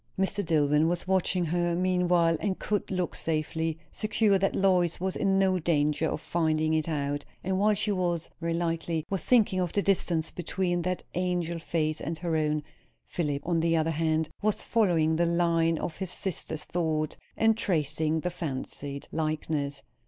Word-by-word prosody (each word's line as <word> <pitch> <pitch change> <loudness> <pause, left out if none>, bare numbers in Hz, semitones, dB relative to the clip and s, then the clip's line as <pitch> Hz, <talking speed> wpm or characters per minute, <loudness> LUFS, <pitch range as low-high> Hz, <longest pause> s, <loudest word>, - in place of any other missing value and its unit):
Mr. 195 +2 0
Dillwyn 150 -2 +3
was 175 +2 -1
watching 185 -1 +1
her, 175 +1 0
meanwhile, 180 -2 +3
and 195 -2 -1
could 210 -2 -2
look 180 -2 -1
safely, 160 0 -1
secure 215 -2 +2
that 195 - +1
Lois 180 -3 +2
was 190 +1 -1
in 195 -1 +2
no 190 -1 +3
danger 155 -1 +1
of - - -2
finding 160 -2 +1
it 160 0 0
out; 145 -1 -1 0.2
and 190 0 0
while 210 +1 +4
she, 210 +1 0 0.5
very 165 -1 -1
likely, 165 -1 -1
was 195 - 0
thinking 215 -6 +3
of 180 -2 -1
the 200 - +1
distance 170 -5 +1
between 175 0 -1
that 180 +1 -2
angel 175 -2 -1
face 155 -1 -1
and 160 +3 -3
her 165 -1 -2
own, 150 -1 +1 0.4
Philip, 145 -4 -2
on 170 -2 +2
the 165 0 +2
other 160 +1 +1
hand, 160 0 0
was 210 0 +1
following 165 -8 +2
the 170 0 +2
line 165 -1 +2
of 160 - -4
his 190 -2 -3
sister's 165 -4 -3
thought, 155 -3 -1 0.2
and 225 0 +4
tracing 160 -5 0
the 180 - -2
fancied 140 -3 -5
likeness. 155 -2 -2
170 Hz, 165 wpm, -28 LUFS, 155-185 Hz, 0.5 s, while